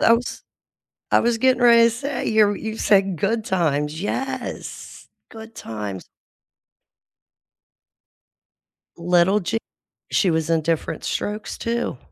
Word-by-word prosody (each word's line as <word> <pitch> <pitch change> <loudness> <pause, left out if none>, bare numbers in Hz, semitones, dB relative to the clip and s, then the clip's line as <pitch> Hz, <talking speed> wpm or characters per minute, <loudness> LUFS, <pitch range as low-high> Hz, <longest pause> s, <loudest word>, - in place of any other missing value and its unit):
I 230 - +5
was 240 +1 -1 0.7
I - - +5
was 235 -1 +1
getting 255 0 +3
ready 235 -1 +7
to 230 - +4
say, 270 +4 -4
you're 210 -2 +3
you 220 0 -5
said 195 -3 +3
Good 215 +6 -1
Times. 155 -5 0
Yes, 265 +7 -5 0.2
Good 225 0 -11
Times. 105 - -6 2.9
Little 180 +4 +3
J 215 +5 -2 0.5
She 185 - +2
was 160 -1 0
in 165 -1 +2
Diff'rent 165 0 -2
Strokes, 210 +1 -3
too. 235 - -2
205 Hz, 120 wpm, -22 LUFS, 165-230 Hz, 2.9 s, ready